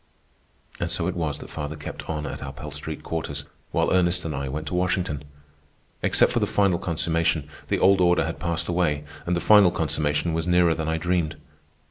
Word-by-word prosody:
And - - -1
so 85 - 0
it 95 - 0
was 80 -4 -2
that - - -11
father 75 +1 -4
kept 75 - -8
on 75 -1 -2
at 70 - -5
our 70 - -5
Pell 75 +2 -8
Street 75 0 -6
quarters, 75 -3 -4 0.3
while - - +2
Ernest 90 -1 +2
and 80 - -2
I 70 0 -3
went 75 +4 -4
to - - -6
Washington. 90 -5 0 0.8
Except - - +3
for - - +1
the - - +1
final 100 -4 +2
consummation, 80 -2 0 0.2
the - - +1
old 95 0 +5
order 90 -1 +4
had 80 - -4
passed 85 -2 -2
away, 85 -5 +1 0.2
and 90 - +2
the - - +1
final 105 -1 +7
consummation 75 0 0
was 80 +1 -1
nearer 90 -1 +4
than 80 -1 -3
I 80 - 0
dreamed. 85 -2 0
80 Hz, 200 wpm, -25 LUFS, 75-90 Hz, 0.8 s, final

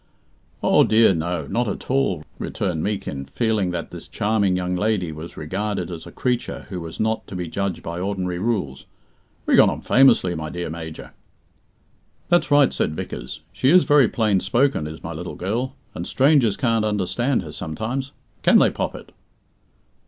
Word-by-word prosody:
"Oh, - - +5
dear, 110 -2 +5
no; 85 -1 -2
not 120 - -1
at 100 - -4
all," 130 - +1 0.2
returned 90 -5 -2
Meekin, 95 -10 -3
feeling 110 - 0
that 85 -2 -4
this - - -8
charming 100 -3 +1
young 90 0 -1
lady 95 -3 0
was 80 +2 -9
regarded 95 +2 -3
as 80 -2 -8
a - - -10
creature 125 -2 -2
who 90 -3 -5
was 80 -1 -8
not 110 +1 -1
to - - -8
be 90 -1 -3
judged 100 +2 -3
by 85 +1 -5
ordinary 90 -2 -2
rules. 95 - -2 0.6
"We - - +3
got - - +7
on - - -4
famously, 120 -9 +4
my 80 -1 -4
dear 85 -1 -4
Major." 80 -1 -8 1.2
"That's 175 0 +3
right," 145 -2 +5
said 75 - -1
Vickers. 75 - -6
"She 105 +7 +2
is 180 +3 +7
very 145 -5 +5
plain 105 -4 +1
spoken, 125 - +1
is 80 0 -9
my 85 - -5
little 85 +3 -6
girl, 120 +8 -2 0.2
and - - -5
strangers 135 -6 +3
can't 115 -3 +1
understand 110 +5 0
her 80 - -8
sometimes. 110 - -4 0.3
Can - - +6
they, - - +5
Poppet?" - - -5
100 Hz, 170 wpm, -22 LUFS, 85-115 Hz, 1.2 s, got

